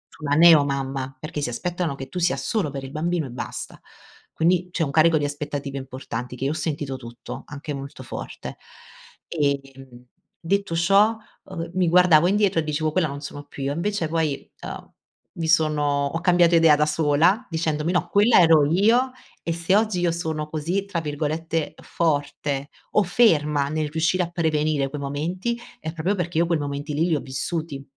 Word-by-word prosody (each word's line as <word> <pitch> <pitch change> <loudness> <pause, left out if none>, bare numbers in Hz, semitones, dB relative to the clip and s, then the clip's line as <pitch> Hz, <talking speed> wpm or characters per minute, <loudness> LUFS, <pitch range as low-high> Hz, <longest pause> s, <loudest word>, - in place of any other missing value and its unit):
su 155 - -15
una 145 0 +2
neo 165 -2 +8
mamma, 135 -1 -3
perché 155 0 -5
si 130 - -1
aspettano 175 +2 -2
che 135 -1 -7
tu 180 - -5
sia 175 0 +1
solo 210 -9 -1
per 135 -1 -6
il 135 - -8
bambino 165 +2 -1
e 130 - -8
basta. 120 - -7 0.5
Quindi 180 +2 +1
c'è 170 - 0
un 140 - -2
carico 160 +2 +4
di 145 - 0
aspettative 145 -1 -4
importanti 125 -2 -6
che 130 - -6
io 140 - +1
ho - - -1
sentito 145 -4 -3
tutto, 120 -1 -9
anche 145 +1 -6
molto 140 0 -8
forte. - - -7 0.7
Ehm, 135 -5 -3 0.3
detto 195 0 -1
ciò, 200 +6 +4 0.3
uhm, 170 -2 -6
mi 185 -2 +2
guardavo 175 -2 +6
indietro 200 -3 +2
e - - 0
dicevo: 155 +1 -1
“Quella 165 0 +1
non 140 0 -7
sono 145 0 -8
più 140 - -8
io.” 140 +1 -1
invece 175 +1 -1
poi, 155 -3 -1
ehm, - - -8 0.4
mi 165 -1 -3
sono 150 -3 +2
ho 165 +4 -3
cambiato 175 -1 +4
idea 165 -2 +6
da 150 +1 +2
sola 160 - +2
dicendomi: 160 -1 -1
“No 175 -1 0
quella 210 +4 +5
ero 160 -4 +6
io 235 +8 +3 0.3
e 170 - -3
se 170 +3 +1
oggi 210 -4 +2
io 175 -1 +2
sono 160 -2 -3
così 170 +6 -2
tra 180 -4 -3
virgolette 155 +1 -2
"forte 145 -3 -1 0.2
o - - +4
ferma" 150 -8 +3
nel 155 0 -2
riuscire 165 +4 +1
a 170 - -1
prevenire 155 -4 0
quei 145 +1 -6
momenti 175 +12 -3 0.2
è 160 - -5
proprio 170 +4 -1
perché 175 -4 -3
io 170 - +4
quei 170 -2 0
momenti 145 +1 -4
lì 160 +4 +1
li 165 - +2
ho - - 0
vissuti 140 +2 -4
155 Hz, 185 wpm, -23 LUFS, 145-175 Hz, 0.7 s, neo